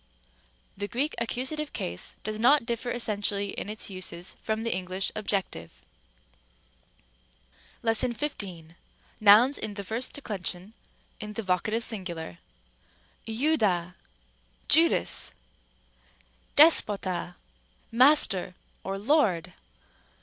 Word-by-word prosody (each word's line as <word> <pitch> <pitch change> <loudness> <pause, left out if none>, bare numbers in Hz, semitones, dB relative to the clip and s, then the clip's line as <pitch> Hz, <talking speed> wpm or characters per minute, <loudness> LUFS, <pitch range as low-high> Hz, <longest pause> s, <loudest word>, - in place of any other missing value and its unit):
The 205 +1 -4
Greek 270 +8 -1
accusative 265 +6 -3
case 85 +1 -5
does 215 0 -4
not 260 +3 +4
differ 235 +1 -3
essentially 205 -4 -1
in - - -5
its 215 +1 0
uses 185 -1 -4
from 220 0 -2
the 230 - 0
English 185 +1 -2
objective. 185 - -3 2.0
§15. 220 - -1 0.5
Nouns 220 +7 +6
of 205 - -3
the 200 - -5
first 225 +6 -1
declension, 200 -6 -6 0.5
in 210 -1 -7
the 225 - -4
vocative 205 +5 0
singular. 175 - -4 0.9
*Iovda, 220 - +1 0.7
Judas! - - +4 1.2
(Luke 315 +3 +9
xxii. - - +5
48.) 205 -2 -3
δέσποτα, 180 -1 -4 0.6
Master! 230 -8 +4 0.3
or 195 0 -4
Lord! 210 - +1
210 Hz, 100 wpm, -27 LUFS, 185-235 Hz, 2.0 s, Luke